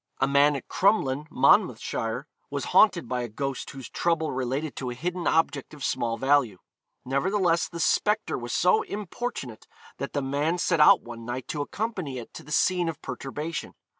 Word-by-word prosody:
A 135 - +2
man 140 +1 +4
at 135 - -6
Crumlyn, 150 -8 +1
Monmouthshire, - - +2 0.2
was - - -3
haunted - - +5
by 125 -1 -1
a 120 - -3
ghost 135 +4 -4
whose 135 -4 -8
trouble 165 -2 0
related 130 +4 -2
to 130 - -3
a 120 - -5
hidden 175 +5 -3
object 155 -3 +1
of 145 - -10
small 115 -1 -1
value. 135 -7 +2 0.5
Nevertheless 170 +5 +1
the 170 - -7
spectre 210 +6 +1
was 120 -1 -5
so 180 - +3
importunate 200 - -5 0.3
that - - -4
the 145 - -1
man 145 +5 0
set 170 -2 +1
out 150 - +7
one 115 -1 -9
night 120 +1 -5
to 150 - -2
accompany 185 - -3
it 120 - -9
to - - -8
the 150 - -13
scene 175 +2 +2
of 160 - -6
perturbation. 150 +4 -5
145 Hz, 175 wpm, -26 LUFS, 130-170 Hz, 0.5 s, out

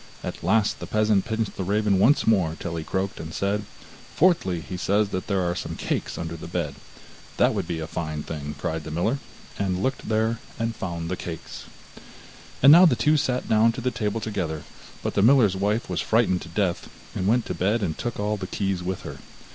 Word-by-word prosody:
At - - -5
last 110 -2 +2
the - - -6
peasant 105 -2 +2
pinched 110 -2 -2
the 95 - -2
raven 100 0 +2
once 140 +9 +4
more 90 -7 +2
till 85 -1 -4
he 80 - -3
croaked, 95 +3 -2
and 80 0 -6
said: 100 +4 -1 0.5
'Fourthly, 150 - +3
he 85 +3 -7
says 100 +3 +1
that 95 -2 -4
there 100 -3 +1
are 85 -1 0
some 90 - -5
cakes - - -3
under 85 0 -4
the 80 - -8
bed.' 85 -4 -2 0.6
'That - - +4
would - - -2
be 85 - -2
a 80 - -3
fine 80 -2 -4
thing!' 75 -1 -5
cried 80 0 -3
the - - -7
miller, 90 - 0 0.4
and 95 -1 0
looked 130 -4 -2
there, 110 +1 +1 0.2
and 115 -1 -2
found 85 -4 -4
the - - 0
cakes. 85 -2 -7 1.0
And 140 - +10
now 175 +4 +9
the 135 - +3
two 150 +5 +3
sat 130 -4 0
down 110 +1 +4
to 125 - -5
the 125 +1 0
table 105 -1 -2
together, 90 -8 -3 0.4
but - - -1
the - - +2
miller's 115 -4 +5
wife 105 +4 0
was - - -1
frightened 110 -5 +2
to 85 - -9
death, 90 0 -1 0.2
and 95 - -2
went 120 +2 +3
to - - -3
bed 105 +4 +1
and 80 -4 -1
took 120 -2 -4
all 105 +1 0
the 95 -2 -5
keys 95 -2 -1
with 95 +1 -4
her. - - -7
100 Hz, 215 wpm, -25 LUFS, 85-110 Hz, 1.0 s, And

